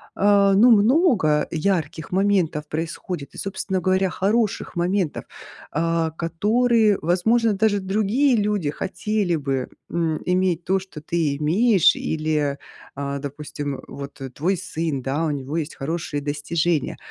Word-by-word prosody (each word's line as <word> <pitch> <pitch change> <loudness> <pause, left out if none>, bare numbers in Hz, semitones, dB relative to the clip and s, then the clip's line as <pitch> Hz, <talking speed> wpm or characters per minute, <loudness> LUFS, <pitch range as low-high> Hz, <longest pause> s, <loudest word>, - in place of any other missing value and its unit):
э, 200 0 +4
ну, 230 +5 +6
много 215 - +4
ярких 165 -2 -2
моментов 185 -6 +1
происходит 165 -1 -5
и, - - -13
собственно 190 -1 -3
говоря, 190 0 +1
хороших 210 +2 0
моментов, 175 -1 -1 0.5
э, 165 0 +1
которые, 215 +5 +2
возможно, 215 +7 +2
даже 205 0 +2
другие 215 +8 +2
люди 205 -7 0
хотели 195 +3 -1
бы, 135 -3 -2 0.2
м, 165 -2 -1
иметь 180 -2 +1
то, 190 - +2
что 185 -5 -11
ты 155 -2 -1
имеешь, 190 +6 +4
или, 155 -3 -1 0.4
э, 140 0 -3
допустим, 145 0 -5
вот 140 0 -9
твой 180 +6 +1
сын, 160 -5 -3
да, 140 +5 -1
у 155 - 0
него 145 +2 -4
есть 160 -1 -3
хорошие 155 0 -3
достижения. 150 +2 -1
170 Hz, 130 wpm, -22 LUFS, 150-200 Hz, 0.5 s, ну